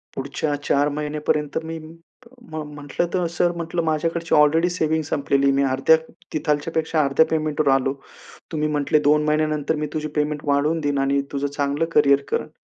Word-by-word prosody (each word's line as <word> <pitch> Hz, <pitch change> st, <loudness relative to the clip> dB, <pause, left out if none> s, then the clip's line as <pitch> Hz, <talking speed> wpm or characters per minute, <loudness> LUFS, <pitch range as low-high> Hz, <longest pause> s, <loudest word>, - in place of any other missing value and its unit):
पुढच्या 140 Hz, +2 st, -2 dB
4 145 Hz, +1 st, +2 dB
महिन्यापर्यंत 150 Hz, 0 st, -2 dB
मी 165 Hz, 0 st, -5 dB
म्ह 165 Hz, +3 st, -11 dB
म्हटलं, 145 Hz, +4 st, -3 dB
तर, 180 Hz, -2 st, +1 dB
"सर" 175 Hz, +1 st, +2 dB
म्हंटलं, 170 Hz, 0 st, -2 dB
"माझ्याकडची 165 Hz, +1 st, 0 dB
ऑलरेडी 160 Hz, +4 st, +4 dB
सेव्हिंग 160 Hz, -2 st, 0 dB
संपलेली. 140 Hz, -1 st, +2 dB
मी 140 Hz, +1 st, +2 dB
अर्ध्या 135 Hz, +4 st, +4 dB, 0.4 s
तिथल्यापेक्षा 155 Hz, +1 st, 0 dB
अर्ध्या 140 Hz, +3 st, +3 dB
पेमेंटवर 155 Hz, -2 st, -1 dB
आलो. 135 Hz, 0 st, +1 dB, 0.6 s
तुम्ही 155 Hz, -1 st, 0 dB
म्हटले, 150 Hz, 0 st, +1 dB
"2 150 Hz, 0 st, +4 dB
महिन्यानंतर 155 Hz, 0 st, 0 dB
मी -, -, -1 dB
तुझी 155 Hz, -1 st, -2 dB
पेमेंट 150 Hz, 0 st, -1 dB
वाढवून 145 Hz, +3 st, +1 dB
देईन 145 Hz, -2 st, -1 dB
आणि 140 Hz, 0 st, +1 dB
तुझं 140 Hz, 0 st, -1 dB
चांगलं 145 Hz, +2 st, -1 dB
करियर 140 Hz, 0 st, +5 dB
करेन.'" -, -, -2 dB
150 Hz, 155 wpm, -22 LUFS, 145-160 Hz, 0.6 s, करियर